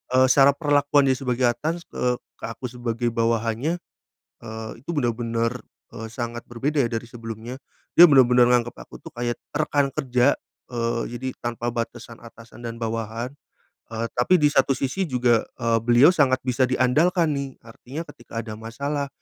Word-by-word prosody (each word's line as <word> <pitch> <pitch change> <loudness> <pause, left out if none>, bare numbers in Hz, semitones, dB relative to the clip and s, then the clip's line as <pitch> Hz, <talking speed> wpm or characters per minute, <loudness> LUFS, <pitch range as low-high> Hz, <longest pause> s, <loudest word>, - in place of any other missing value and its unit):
eee, 130 0 +6
secara 140 0 +6
perlakuannya 145 -2 +3
sebagai 125 -2 +1
atas 160 +8 -3
ke 125 0 -1 0.2
ke - - -6
aku 115 +3 -7
sebagai 120 -1 -2
bawahannya, 115 +6 0 0.7
eee, 110 -1 -7
itu 150 - -7
benar-benar, 115 -2 -1 0.3
eee, 110 - -7
sangat 120 +1 -5
berbeda 135 +6 -2
ya - - -3
dari 115 0 -3
sebelumnya. 115 +2 -7 0.4
Dia 175 - +12
benar-benar 125 -3 +6
nganggep 120 -1 +2
aku - - -11
tuh - - -10
kayak 120 0 -2 0.2
rekan 145 -2 +1
kerja, 125 0 +2 0.4
eee, 115 -1 -1 0.2
jadi 130 - -4
tanpa 120 0 -3
batasan 115 0 -5
atasan 115 0 -14
dan 115 0 -6
bawahan, 115 +2 -4 0.6
eee, 115 +1 -1
tapi 125 +9 +4
di 150 - +5
satu 135 -1 +3
sisi 135 +9 -2
juga, 125 -4 +2
eee, 115 -2 +1
beliau 120 +7 +6
sangat 135 -7 +2
bisa 130 0 +1
diandalkan 155 +7 +2
nih. 140 -2 -3
Artinya 125 +6 -8
ketika 115 -1 -7
ada 110 -1 -8
masalah, 140 +6 -3
120 Hz, 155 wpm, -24 LUFS, 115-140 Hz, 0.7 s, Dia